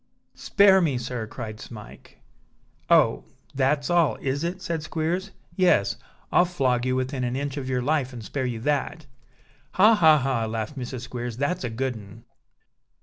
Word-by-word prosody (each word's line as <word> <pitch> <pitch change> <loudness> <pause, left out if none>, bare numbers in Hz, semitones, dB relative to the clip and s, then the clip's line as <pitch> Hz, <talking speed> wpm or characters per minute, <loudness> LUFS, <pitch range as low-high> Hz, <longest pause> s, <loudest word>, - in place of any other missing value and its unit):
"Spare 195 -2 +4
me, 145 -7 +1
sir!" 120 -2 -4
cried 110 -2 -7
Smike. 110 -3 -12 0.7
"Oh! - - +4 0.3
that's 140 +1 +1
all, 175 -3 +3
is 140 +3 -3
it?" 175 +2 -3
said 170 -3 -3
Squeers. 165 +5 -2 0.3
"Yes, 140 - +2 0.3
I'll 180 - +5
flog 130 -8 0
you 130 - +1
within 130 0 -2
an 120 0 -2
inch 140 0 -3
of 135 -3 -5
your 125 -1 -1
life, 145 -2 0
and 120 -4 -9
spare 130 +1 -3
you 120 -2 -4
that." 150 +3 -1 0.7
"Ha! 210 +5 +6
ha! 160 -7 +6
ha!" 130 -5 -1
laughed 110 +4 -4
Mrs. 125 -2 -6
Squeers, 120 -2 -6
"that's 145 +6 -1
a 125 - -2
good 130 +3 -2
un!" 110 0 -12
130 Hz, 165 wpm, -25 LUFS, 120-160 Hz, 0.7 s, Ha